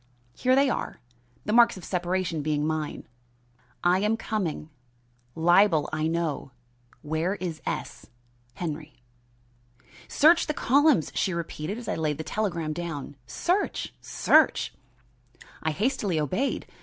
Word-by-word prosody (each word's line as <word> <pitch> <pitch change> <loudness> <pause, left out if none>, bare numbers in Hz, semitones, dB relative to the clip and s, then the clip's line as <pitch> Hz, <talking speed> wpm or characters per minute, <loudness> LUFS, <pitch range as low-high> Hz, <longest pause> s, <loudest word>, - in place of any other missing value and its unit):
Here 255 0 +3
they 275 +1 +4
are 255 - -3 0.5
the 210 - -1
marks 235 -3 +6
of 185 - -9
separation 180 -2 -1
being 150 0 0
mine: 155 -1 -3 0.8
I 180 +1 +4
am 210 +3 +1
coming 180 -9 -3 0.6
libel 175 -1 +4
I 155 0 0
know 165 -4 -2 0.5
where 160 +5 -1
is 175 -5 -5
S. - - -4 0.5
Henry. 155 -2 -5 1.1
"Search 325 +3 +5
the 305 - -1
columns," 280 - +3
she 185 -3 0
repeated, 170 +3 -4
as 240 - -8
I - - 0
laid 155 -3 -1
the 160 - -4
telegram 170 -5 -2
down. 160 -4 -5
"Search! 360 - -1
Search!" - - +3 0.9
I 160 - 0
hastily 200 - 0
obeyed. 185 - -1
175 Hz, 125 wpm, -27 LUFS, 155-215 Hz, 1.1 s, marks